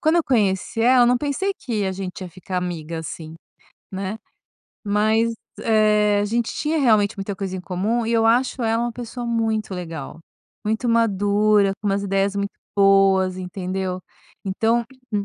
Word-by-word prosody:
quando 315 +1 +2
eu 340 - +4
conheci 210 - 0
ela, 250 +2 +5
eu - - +5
não 245 0 +3
pensei 295 +8 -1
que 225 -7 -2
a 190 - 0
gente 190 0 -6
ia 185 - -6
ficar 185 +2 -6
amiga, 170 -3 -3
assim, 160 0 -8 0.6
né. 195 +2 -4 0.7
Mas, 215 +3 +2 0.3
eh, 210 -2 +3
a - - +1
gente 230 +2 -1
tinha, 310 +1 -1
realmente, 215 -6 +3
muita 195 0 -4
coisa 190 -1 -4
em - - -5
comum. 200 +6 -1
E, 230 - -1
eu 225 -1 +3
acho 250 +3 +2
ela 225 0 +1
uma 240 - -3
pessoa 240 +1 -6
muito 225 -3 -1
legal. 165 -5 -6 0.5
Muito 220 +3 -1
madura, 205 -2 +3
com 210 - -4
umas 200 0 0
ideias 195 0 0
muito 200 0 -1 0.3
boas, 195 -2 +4
entendeu. 185 0 -4 0.4
Então, 225 +5 +1 0.3
m 205 -1 0
205 Hz, 170 wpm, -22 LUFS, 190-230 Hz, 0.7 s, ela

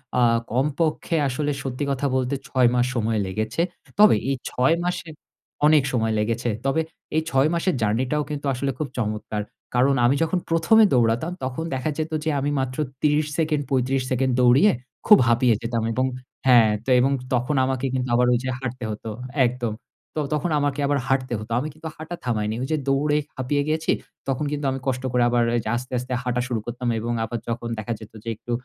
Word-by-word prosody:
আ - - +1 0.3
কমপক্ষে 150 +6 0
আসলে 145 +3 -1
সত্যি 135 +1 -3
কথা 140 +1 -1
বলতে 130 +1 0
৬ 125 -1 +3
মাস 125 0 +3
সময় 115 -1 0
লেগেছে। 110 - -2 0.4
তবে 210 - +8
এই 135 - +1
৬ 130 +5 +2
মাসে 180 -1 -2 0.6
অনেক 150 -2 +6
সময় 110 -2 +1
লেগেছে। 115 +3 -1 0.2
তবে 135 +4 +2 0.3
এই 160 - +3
৬ 135 0 +3
মাসের 170 +2 +1
জার্নি 110 +4 +1
টাও 150 0 +1
কিন্তু 145 -1 -4
আসলে 135 +2 -1
খুব 155 - -1
চমৎকার। 105 -2 -2 0.3
কারণ 135 +3 +4
আমি 125 +3 +4
যখন 165 +3 0
১মে 165 +7 +4 0.2
দৌড়াতাম 120 +7 +2
তখন 130 +4 -3
দেখা 130 +3 -1
যেত 160 0 -2
যে 160 - 0
আমি 140 +1 -1
মাত্র 130 -1 -3 0.2
৩০ 150 0 +3
সেকেন্ড, 155 -2 +1
৩৫ 130 0 +1
সেকেন্ড, 130 0 +1
দৌড়িয়ে 125 +12 +6 0.4
খুব 210 - +9
হাঁপিয়ে 120 +1 +4
যেতাম 115 -1 -2
এবং 130 +3 +1 0.4
হ্যাঁ, 120 -4 +7 0.2
তো - - -4
এবং 135 +2 +3 0.2
তখন 125 +4 +1
আমাকে 130 0 -1
কিন্তু 130 -1 -1
আবার 125 +1 +3
ঐযে 125 +2 -1
হাঁটতে 130 -1 -5
হত 105 - -8 0.4
একদম। 120 -2 -3 0.4
তো 155 - 0
তখন 150 +3 0
আমাকে 145 0 -1
আবার 145 0 +1
হাঁটতে 130 -2 0
হত। 110 +1 -9
আমি 145 - -3
কিন্তু 160 +2 -8
হাঁটা 160 +3 -6
থামায়নি। 110 -3 -1
ওই 130 - -2
যে 155 - +2
দৌড়ে 145 +2 +2 0.2
হাপিয়ে 145 +3 0
গেছি 160 +1 +1 0.4
তখন 135 +2 -1
কিন্তু 145 -1 -3
আমি 135 - -3
কষ্ট 130 0 -1
করে 125 0 +3
আবার 120 0 +2
ঐযে 115 -2 -1
আস্তে, 125 +1 -5
আস্তে 125 +1 -5
হাঁটা 125 0 0
শুরু 120 -3 -1
করতাম 120 +1 -4
এবং 120 +2 -2
আবার 115 +1 -3
যখন 120 0 -3
দেখা 110 +2 -3
যেত 110 -1 -12
যে 115 - -4
একটু 120 - -9
130 Hz, 195 wpm, -23 LUFS, 120-145 Hz, 0.6 s, খুব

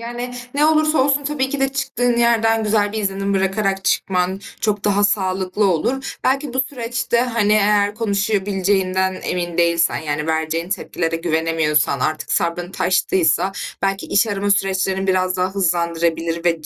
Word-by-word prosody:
Yani, 240 +1 -6 0.2
ne 295 +2 +3
olursa 310 0 +3
olsun 280 +1 +1
tabii 280 -2 -1
ki 280 0 -4
de 270 - +2
çıktığın 245 -3 -1
yerden 225 -1 +2
güzel 205 -1 +1
bir 220 - -3
izlenim 195 -1 -1
bırakarak 195 0 0
çıkman 185 0 0 0.2
çok 210 -2 -1
daha 205 0 +2
sağlıklı 190 0 0
olur. 250 +11 -2
Belki 270 0 0
bu 260 - +2
süreçte, 235 -3 -1
hani, 230 -4 +1
eğer 205 -1 +3
konuşabileceğinden 195 -3 0
emin 175 -1 -3
değilsen, 170 -1 +2
yani, 150 -1 -3
vereceğin 160 +1 -1
tepkilere 165 -3 -2
güvenemiyorsan, 160 -4 0
artık 155 +3 -2
sabrın 175 +1 -1
taştıysa 185 0 +1 0.3
belki 195 0 -1
iş 200 - +2
arama 205 -1 -1
süreçlerini 190 -1 0
biraz 185 -1 +1
daha 185 +1 -1
hızlandırabilir 170 -2 0
ve 165 -2 +1
195 Hz, 150 wpm, -20 LUFS, 175-230 Hz, 0.3 s, ne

